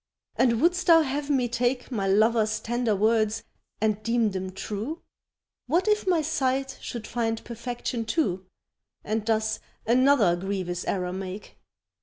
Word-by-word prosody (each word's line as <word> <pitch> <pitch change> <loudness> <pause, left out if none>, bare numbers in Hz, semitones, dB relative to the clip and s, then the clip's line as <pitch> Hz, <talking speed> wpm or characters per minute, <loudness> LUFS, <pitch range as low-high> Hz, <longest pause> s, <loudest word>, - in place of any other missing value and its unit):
And 235 -3 +3
wouldst 355 +5 +2
thou 330 -1 +8
have 285 +1 -3
me 260 -4 +2
take 245 +2 -1
My 200 -5 -1
lover's 215 +2 +3
tender 235 -1 0
words 220 +1 +2 0.4
and 215 -1 0
deem 230 -1 +1
them 190 0 -4
true? 215 - -5 0.6
What 340 - +1
if 425 -2 +2
my 345 -4 +3
sight 270 -3 -1
should 235 -3 -6
find 225 -1 -2
perfection, 235 0 -4
too, 190 - -1 0.6
And 215 +1 -1
thus 220 0 0 0.3
another 245 -5 +4
grievous 185 -1 -3
error 180 -2 -1
make? 190 +1 -7
230 Hz, 140 wpm, -26 LUFS, 210-260 Hz, 0.6 s, thou